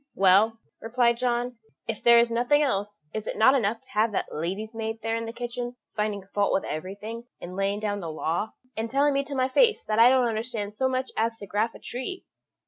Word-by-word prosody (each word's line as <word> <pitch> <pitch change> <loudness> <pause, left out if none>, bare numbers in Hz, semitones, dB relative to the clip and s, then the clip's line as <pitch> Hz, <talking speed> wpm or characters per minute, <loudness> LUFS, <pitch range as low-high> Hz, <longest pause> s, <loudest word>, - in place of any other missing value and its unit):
"Well," 195 +4 +5 0.2
replied 235 +1 +2
John, 245 0 -1 0.3
"if 225 -2 -3
there 235 0 +7
is 235 0 +4
nothing 245 +6 +3
else, 205 - -2
is 215 -1 -4
it - - -3
not 240 +5 +6
enough 230 -4 +1
to 260 0 -18
have 220 -1 +2
that - - -2
lady's 195 +8 -3
maid 225 0 -4
there 225 0 0
in 230 0 -3
the - - -4
kitchen 240 +1 -5 0.2
finding 210 -2 -1
fault 205 -1 +2
with - - +1
everything, 205 +8 -6
and 180 +1 -8
laying 195 +1 0
down 205 -1 -2
the 170 -4 -5
law, 165 +7 -2 0.2
and 225 +1 -3
telling 280 +3 +3
me 275 0 +1
to 280 0 -6
my 255 -1 +2
face 450 - +3
that 215 0 0
I 235 +2 +9
don't 255 -1 +4
understand 220 -2 -3
so 260 +3 +1
much 260 0 -2
as 225 +1 0
to 205 - -8
graff 210 +4 -1
a - - -11
tree?" 315 +10 -5
225 Hz, 225 wpm, -26 LUFS, 205-245 Hz, 0.3 s, I